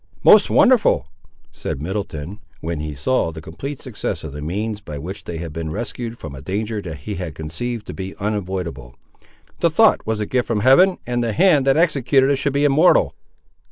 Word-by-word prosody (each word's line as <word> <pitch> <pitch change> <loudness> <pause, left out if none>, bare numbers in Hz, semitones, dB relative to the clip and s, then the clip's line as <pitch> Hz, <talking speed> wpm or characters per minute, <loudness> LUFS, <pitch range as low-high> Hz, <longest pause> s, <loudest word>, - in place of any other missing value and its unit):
"Most 210 - +7
wonderful!" 245 - +4 0.5
said - - -5
Middleton, 90 +1 -5 0.2
when 80 -1 -4
he 75 -1 -5
saw 85 - 0
the 80 - -8
complete 130 - -7
success 120 -6 -4
of 80 - -6
the 75 +1 -7
means 105 +7 -3
by 75 -8 -7
which 90 +8 -7
they 85 - -5
had 80 -2 -6
been 80 0 -4
rescued 115 +4 -5
from 80 - -8
a 65 - -9
danger 105 +7 -3
that 80 -5 -6
he 105 - -5
had 90 -6 -5
conceived 105 +9 -5
to - - -7
be 95 0 -6
unavoidable. 95 - -4 0.6
"The - - +3
thought - - +4
was 110 -1 -1
a 105 - -1
gift 125 +3 0
from 110 -3 0
Heaven, 175 - +5
and 120 -1 -1
the 115 -2 -1
hand 155 - +4
that 135 +2 +4
executed 140 -4 +3
it 140 - +2
should 140 +1 0
be 140 +1 +2
immortal!" 145 - +4
105 Hz, 195 wpm, -21 LUFS, 80-130 Hz, 0.6 s, Most